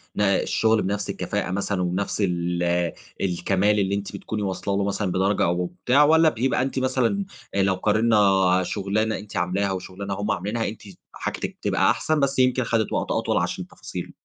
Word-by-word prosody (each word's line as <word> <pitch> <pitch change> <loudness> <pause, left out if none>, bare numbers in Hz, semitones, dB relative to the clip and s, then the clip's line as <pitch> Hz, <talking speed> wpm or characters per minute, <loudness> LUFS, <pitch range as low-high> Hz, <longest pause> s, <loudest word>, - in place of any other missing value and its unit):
ن - - -1
الشغل 110 +2 +2
بنفس 100 +1 -2
الكفاءة 90 - -2
مثلًا 100 -1 -1
ونفس 95 +4 -1
ال 85 -1 0 0.3
الكمال 95 +3 +1
اللي 100 0 +1
أنتِ 100 0 -5
بتكوني 110 -1 -4
واصلة 100 0 -2
له 100 - +1
مثلًا 100 -1 -1
بدرجة 95 +2 +1
أو 90 +1 0 0.2
بتاع، 140 +4 +5
والّا 160 +1 +5
بيبقى 125 0 0
أنتِ 135 0 -1
مثلًا 130 +10 0 0.3
لو 95 -1 +3
قارنا 100 -3 +3
شغلانة 105 +3 -1
أنتِ 105 - -8
عاملاها 95 +3 0
وشغلانة 95 +1 -5
هم 105 +2 -2
عاملينها 105 +5 -2
أنتِ 110 - -7 0.3
حاجتكِ - - -4
تبقى - - +2
أحسن، 155 -1 0
بس 140 -1 +1
يمكن 130 0 +3
خَدِت 115 -2 0
وقت - - -1
أطول - - 0
عشان - - -2
تفاصيله؟ - - -7
100 Hz, 170 wpm, -24 LUFS, 95-110 Hz, 0.3 s, بتاع